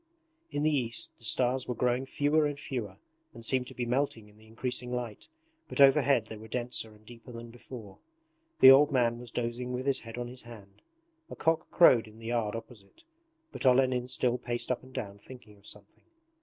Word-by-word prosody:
In 145 - -2
the 155 -1 +3
east 115 -4 -1
the - - -17
stars 125 +3 +2
were 125 - -2
growing 125 +3 0
fewer 150 +2 +2
and 145 -1 -5
fewer 115 -10 -5 0.4
and 115 -1 -9
seemed 125 0 0
to - - -11
be 120 - -2
melting 120 -3 -1
in 105 - -22
the 110 - -19
increasing 125 +2 -4
light, 120 -3 -5 0.4
but - - -5
overhead 135 -3 +5
they 110 0 -9
were 110 +1 -11
denser 120 -2 -3
and 105 0 -22
deeper 120 +2 -12
than 115 0 -9
before. 115 -4 -11 0.6
The 130 - +11
old 145 +3 +6
man 120 -3 +2
was 120 -1 -8
dozing 120 +2 -3
with 125 +1 -3
his 140 -1 +2
head 115 0 -10
on 120 - -3
his 125 +1 -8
hand. 105 -5 -14 0.5
A - - -7
cock 165 0 0
crowed 120 -10 +6
in 110 0 -15
the 115 - -12
yard 115 -2 -1
opposite, 115 - -11 0.5
but - - -6
Olenin 130 -1 +3
still 125 -1 0
paced 120 +1 -3
up 125 - -1
and 130 - -15
down 100 -6 -6
thinking 110 -2 -14
of 100 - -15
something. 105 -1 -11
120 Hz, 205 wpm, -30 LUFS, 115-130 Hz, 0.6 s, The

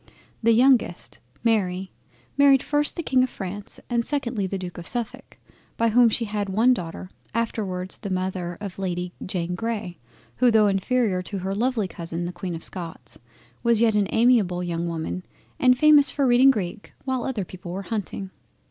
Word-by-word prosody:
The 230 0 +4
youngest, 240 -6 +2 0.2
Mary, 190 -5 0 0.4
married 280 -2 +5
first 295 0 +2
the 335 - -4
King 260 -4 +3
of 255 - +1
France 200 0 -6
and 235 -1 0
secondly 235 -8 -2
the 195 - -3
D. 180 -1 -5
of 170 0 -6
Suffolk, 240 -3 -3 0.4
by 230 0 +3
whom 235 +1 +5
she 230 +1 0
had 205 -1 -3
one 225 +6 +4
daughter, 180 -3 -6 0.2
afterwards 190 -5 -2
the 200 - -5
Mother 185 -2 -3
of 200 -2 -7
Lady 180 -1 -3
Jane 180 -2 -3
Grey, 215 -3 -4 0.4
who 250 - +4
tho' 220 -2 +5
inferior 200 0 +1
to 195 +2 -5
her 190 +1 -3
lovely 225 -1 0
Cousin 170 0 -5
the 175 - -5
Queen 175 0 -5
of 165 - -8
Scots, 165 - -7 0.4
was 235 -2 +3
yet 230 -1 +4
an 205 -2 +2
amiable 225 -7 +3
young 170 -1 -2
woman 165 +2 -4 0.4
and 255 -1 +5
famous 300 0 +6
for 280 - 0
reading 250 +2 +6
Greek 205 -4 -2
while 260 -2 -1
other 230 -8 -2
people 180 -1 -9
were 195 +2 -4
hunting. 200 -3 -4
205 Hz, 175 wpm, -24 LUFS, 180-240 Hz, 0.4 s, famous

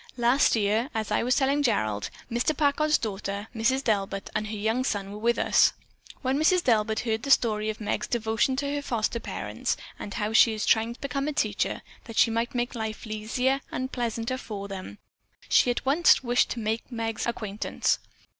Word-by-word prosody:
Last 240 +3 +4
year, 220 +4 +1
as 220 -1 -2
I 210 - +2
was 250 +3 +2
telling 275 +1 +2
Gerald, 110 - 0 0.2
Mr. 245 +6 0
Packard's 300 +1 +3
daughter, 200 -1 -4
Mrs. 260 +5 +1
Delbert, 195 -3 -1
and 215 0 -1
her 215 - -5
young 220 +5 0
son 200 -6 -2
were 210 - -7
with 235 +2 +1
us. - - +4 0.5
When 265 +2 +1
Mrs. 350 +3 +3
Delbert 220 -2 +2
heard 225 -2 -1
the 275 - -5
story 215 -5 +3
of 215 - -4
Meg's 210 - -2
devotion 225 +2 0
to 280 +1 -2
her 290 - -1
foster 235 -3 -1
parents - - -3 0.2
and 205 - -6
how 210 +1 -2
she 225 0 +6
is 215 0 -2
trying 225 +1 +2
to - - -20
become 275 +1 -2
a 300 - -1
teacher 210 -7 -1 0.2
that 230 -2 -9
she 230 - +5
might 230 +3 -1
make 240 0 -1
life 220 -1 -5
easier 230 +5 -1
and 260 +1 -3
pleasanter 235 +1 -2
for 200 -5 -6
them, 195 +1 -7 0.5
she - - +5
at 245 - -1
once 290 +2 +4
wished 245 0 +2
to 240 - -3
make 220 +3 -3
Meg's 225 -1 -3
acquaintance. 215 -3 -1
230 Hz, 190 wpm, -27 LUFS, 215-260 Hz, 0.5 s, she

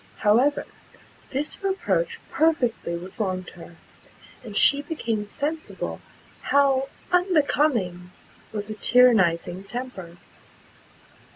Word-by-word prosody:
However, 250 +8 +3 0.6
this 290 +8 -2
reproach 460 +5 -1
perfectly 250 - +1
reformed 185 +1 -4
her, 175 0 -13 0.7
and 210 -4 -6
she 285 0 +5
became 230 -9 -3
sensible 310 +8 -4 0.4
how 275 -1 +2 0.2
unbecoming 290 - +1 0.4
was 205 -1 -4
a - - -2
tyrannizing 195 -7 +3
temper. 195 -7 -7
245 Hz, 85 wpm, -24 LUFS, 190-290 Hz, 0.7 s, she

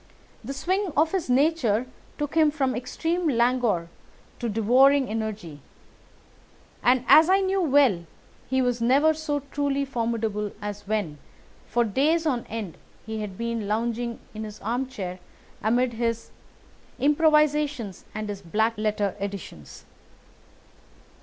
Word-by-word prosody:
The 265 +5 -5
swing 370 +6 -1
of 315 +2 +3
his 370 -8 -2
nature 255 -4 +2 0.3
took 295 -1 -3
him 315 -1 +5
from 270 -4 -1
extreme 325 +8 -2
languor 235 - +1 0.5
to 235 - -2
devouring 255 +6 +4
energy; 215 -8 -4 1.2
and, 255 0 +3
as 320 +2 +7
I 385 +1 +4
knew 385 0 +1
well, 265 - +3 0.4
he 260 0 +2
was 245 -1 0
never 280 +7 +4
so 300 -2 -2
truly 280 -1 0
formidable 225 -5 -2
as 205 -1 -6
when, 200 -9 -2 0.5
for 240 - +2
days 295 +10 +1
on 255 -6 -1
end, 215 -7 -6 0.3
he 220 -1 -4
had 195 -3 -6
been 230 -2 -3
lounging 235 +2 -2
in 215 0 -6
his 215 -1 -8
armchair 225 -5 -3 0.4
amid 240 +3 +1
his 230 0 -2 0.7
improvisations 295 - +2
and 215 0 -3
his 200 -1 -5
black 220 +6 0
letter 210 -2 0
editions. 195 - -7
240 Hz, 125 wpm, -25 LUFS, 215-285 Hz, 1.2 s, as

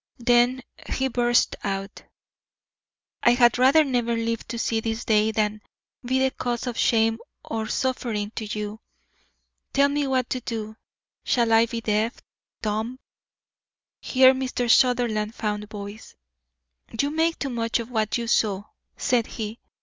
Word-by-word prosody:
Then 245 +1 +3 0.3
he 265 0 0
burst 240 -1 +2
out: 195 0 -4 1.2
"I 240 - +5
had 240 -1 +4
rather 270 +5 +6
never 240 -4 0
lived 230 0 -3
to 235 - -4
see 225 0 0
this 225 +1 -3
day 215 0 +3
than 215 -1 -1 0.4
be 255 +2 0
the 265 0 +2
cause 240 -1 -3
of 245 -2 -3
shame 225 -1 +2 0.3
or 220 -1 -3
suffering 230 -6 -2
to 220 - -5
you. 210 0 -5 0.9
Tell 280 0 +4
me 285 0 0
what 260 -2 +1
to 255 - -1
do. 220 -2 -5 0.5
Shall 235 -2 +2
I 225 +1 +5
be 230 0 -4
deaf, 220 +2 0 0.4
dumb 220 +4 -2 0.5
" - - -70
Here 260 0 +5
Mr. 255 -2 -2
Sutherland 230 -4 +2
found 210 -1 -3
voice. 205 0 -9 0.8
"You 285 +1 +1
make 325 +2 +1
too 275 - -3
much 230 -1 0
of 235 +1 -6
what 220 -2 0
you 235 - -3
saw," 205 -4 +1 0.3
said 240 -3 +1
he. 220 +1 -6
230 Hz, 150 wpm, -24 LUFS, 215-250 Hz, 1.2 s, rather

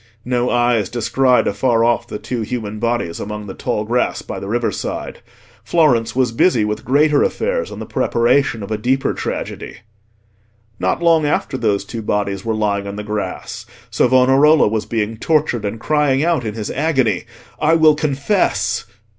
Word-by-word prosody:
No 125 0 0
eyes 120 -4 +1
descried 125 +2 +2
afar 120 -3 +1
off 120 0 +1
the - - -5
two 120 +2 -4
human 110 -2 -4
bodies 115 -7 -1
among 105 0 -6
the 95 - -7
tall 105 - -2
grass 120 +3 -1
by - - -6
the 100 - -7
riverside. 120 +2 -3 0.4
Florence 135 -10 +2
was 130 -3 +2
busy 115 -2 +2
with 105 0 -3
greater 145 +2 +3
affairs, - - -1
and - - -8
the - - -6
preparation 120 -1 +1
of 100 - -8
a 110 - -1
deeper 130 +4 0
tragedy. - - -5 1.0
Not 95 - -1
long 165 -3 +4
after 145 - -1
those 100 -5 0
two 115 +2 -6
bodies 100 -2 -2
were 115 -1 -1
lying 100 -2 -1
in 100 - -5
the 105 - -5
grass, 105 -3 -5 0.2
Savonarola 135 +4 +4
was 110 0 -2
being 110 -1 -2
tortured, 145 -5 0
and 105 +2 -4
crying 145 0 +1
out 165 -8 +1
in 105 -1 -4
his 105 -3 -4
agony, 130 - 0 0.3
"I 160 +2 +3
will 160 -1 +6
confess!" 150 +6 0
120 Hz, 165 wpm, -18 LUFS, 105-140 Hz, 1.0 s, will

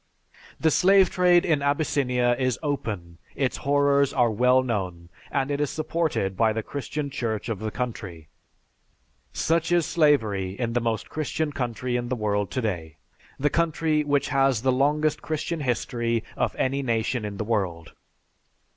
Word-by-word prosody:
"The 160 - +3
slave 190 +3 +5
trade 180 -1 +4
in 155 -5 +2
Abyssinia 135 -4 +1
is 130 -2 +1
open, 100 - -4 0.2
its 135 -2 -1
horrors 140 0 +2
are 120 -3 +2
well 125 +4 +4
known, 90 -8 -3 0.2
and 135 +1 -1
it 145 0 -1
is 145 - 0
supported 155 - -1
by 110 +1 +2
the 110 0 -3
Christian 145 +2 -4
Church 115 -4 -3
of 110 -4 -2
the 110 0 -3
country. 100 -10 -5 1.0
Such 165 +1 0
is 175 -2 +3
slavery 110 - +2
in 115 -2 -1
the 120 - +1
most 115 -2 -2
Christian 155 0 -2
country 125 -1 -2
in 120 0 -4
the 130 - 0
world 105 -3 -1
today, 90 - -3 0.4
the 145 +1 +1
country 160 -2 +1
which 145 -1 +1
has 135 -4 +2
the 130 - +3
longest 145 +4 +1
Christian 160 +1 -3
history 120 -3 -1
of - - -1
any 135 +1 0
nation 115 -1 -1
in 105 -1 -5
the 110 - -2
world. 95 -7 -2
130 Hz, 155 wpm, -25 LUFS, 110-145 Hz, 1.0 s, slave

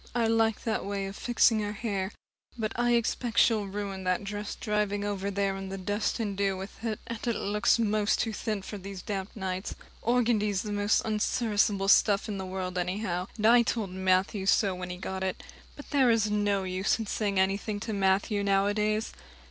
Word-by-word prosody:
I 235 -1 +2
like 225 -1 +2
that 225 -2 -1
way 200 0 -3
of 195 +1 -6
fixing 235 -1 +3
her 210 0 -2
hair. 200 -3 -2 0.5
But 220 -2 -2
I 240 0 +2
expect 235 0 -1
she'll 215 -4 +4
ruin 195 -1 -4
that 185 +1 0
dress 205 +1 -5
driving 210 -1 -1
over 200 -1 -2
there 200 0 0
in 195 0 -6
the 195 - -5
dust 205 +5 -1
and 205 -3 -2
dew 195 -1 0
with 195 +4 -9
it, 225 -1 -2
and 230 -1 -5
it 235 - +1
looks 210 +3 +2
most 215 -2 +1
too 225 - 0
thin 210 -2 -3
for 205 +1 -7
these 195 -1 -8
damp 195 -1 -4
nights. 190 -2 -4 0.3
Organdy's 220 -5 +1
the 210 - -4
most 205 +1 +2
unserviceable 210 -2 +1
stuff 200 +1 +4
in 205 -2 -4
the 190 - -4
world 185 -1 -3
anyhow, 180 0 -2
and 215 - -1
I 240 +2 +7
told 220 -4 -1
Matthew 190 +2 +1
so 200 -1 +3
when 180 0 -6
he 180 - -5
got 190 +1 -4
it. 190 -1 -3 0.3
But 290 - -12
there 270 -4 +4
is 220 -2 +2
no 205 -2 +1
use 185 +1 0
in 225 - -4
saying 200 -2 -1
anything 200 +2 0
to 225 0 -3
Matthew 200 +1 +1
nowadays. 205 +2 +1
205 Hz, 195 wpm, -29 LUFS, 195-220 Hz, 0.5 s, I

